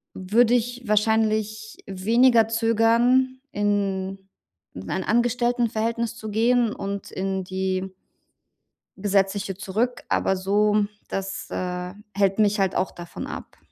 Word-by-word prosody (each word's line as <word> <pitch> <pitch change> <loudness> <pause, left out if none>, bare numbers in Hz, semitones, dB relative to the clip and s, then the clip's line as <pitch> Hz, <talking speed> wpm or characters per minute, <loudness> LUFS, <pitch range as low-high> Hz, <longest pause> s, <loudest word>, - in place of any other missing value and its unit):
würde 220 +6 +3
ich 245 +1 0
wahrscheinlich 215 0 +1
weniger 225 +4 +4
zögern, 230 +3 +2
in 195 -2 -1 0.6
in 90 0 -8
ein 190 - -1
Angestelltenverhältnis 235 -1 0
zu 220 -3 -7
gehen 230 +1 +2
und 200 0 -5
in 190 0 -2
die 190 0 -2 1.1
Gesetzliche 195 0 0
zurück. 225 +6 -2
Aber 190 - +1
so 205 +2 +2 0.2
das, 195 0 -4
äh, 180 0 -4 0.2
hält 195 0 +2
mich 210 -1 +3
halt 190 -1 +1
auch 185 - 0
davon 175 -1 -8
ab. - - -8
210 Hz, 115 wpm, -24 LUFS, 195-230 Hz, 1.1 s, weniger